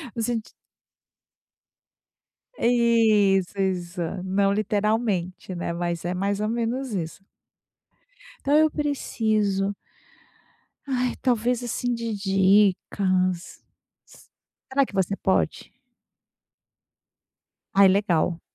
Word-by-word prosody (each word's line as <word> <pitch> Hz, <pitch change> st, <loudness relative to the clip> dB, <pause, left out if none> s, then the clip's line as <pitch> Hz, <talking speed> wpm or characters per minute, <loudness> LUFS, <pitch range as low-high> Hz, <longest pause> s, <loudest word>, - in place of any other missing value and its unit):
no 230 Hz, -, -2 dB
senti 225 Hz, -1 st, -2 dB, 2.1 s
É -, -, 0 dB
isso, 215 Hz, -6 st, +3 dB
exa 180 Hz, -1 st, -2 dB
não 195 Hz, +1 st, +1 dB
literalmente, 205 Hz, -3 st, -1 dB
né, 170 Hz, -1 st, -3 dB
mas 170 Hz, 0 st, -3 dB
é 175 Hz, -, -1 dB
mais 195 Hz, +2 st, -1 dB
ou 215 Hz, -, 0 dB
menos 235 Hz, +3 st, -2 dB
isso. 175 Hz, -1 st, -4 dB, 1.2 s
Então 285 Hz, +2 st, +4 dB
eu 310 Hz, 0 st, +5 dB
preciso 215 Hz, -9 st, -1 dB, 1.1 s
ai, 250 Hz, -2 st, -1 dB
talvez, 245 Hz, -1 st, +1 dB
assim, 245 Hz, +1 st, -2 dB
de 230 Hz, -1 st, -3 dB
dicas. 195 Hz, -2 st, +1 dB, 0.4 s
S -, -, -19 dB, 0.4 s
será 275 Hz, +1 st, +3 dB
que -, -, -15 dB
você 195 Hz, 0 st, 0 dB
pode? 190 Hz, -, -1 dB, 2.0 s
Ai, 195 Hz, 0 st, +7 dB
legal. 180 Hz, -4 st, +1 dB
200 Hz, 95 wpm, -24 LUFS, 185-235 Hz, 2.1 s, Ai